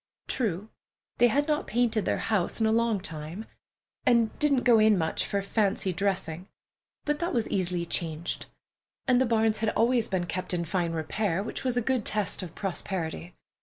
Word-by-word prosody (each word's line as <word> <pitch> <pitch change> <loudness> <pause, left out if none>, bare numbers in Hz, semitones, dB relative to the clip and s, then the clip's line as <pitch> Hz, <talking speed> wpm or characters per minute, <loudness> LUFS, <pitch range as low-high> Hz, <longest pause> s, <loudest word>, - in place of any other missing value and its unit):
True, 210 -3 -1 0.5
they 240 - +7
had 285 +5 +1
not 300 -1 0
painted 230 -2 +1
their - - +1
house 205 -3 0
in 220 - +2
a 220 - +3
long 230 -2 +2
time, 165 +4 -6 0.6
and 235 -2 +3
didn't 280 -4 +3
go 235 -3 +6
in 215 -1 +5
much 160 -2 0
for 200 - 0
fancy 200 -2 0
dressing, 185 -2 -2 0.6
but 295 0 0
that 340 -4 -1
was 230 -2 +1
easily 180 -2 0
changed; 165 -1 -3 0.6
and 255 -1 +4
the 260 - +3
barns 220 -1 +2
had 220 0 +1
always 230 +2 +2
been 185 -2 -1
kept 180 +1 -3
in 170 -1 -1
fine 170 -1 -1
repair, 165 +4 -1
which 225 - -5
was 255 -2 0
a 245 - +2
good 255 -2 +1
test 210 -1 0
of 175 -3 -8
prosperity. 180 -3 -3
210 Hz, 180 wpm, -28 LUFS, 180-235 Hz, 0.6 s, they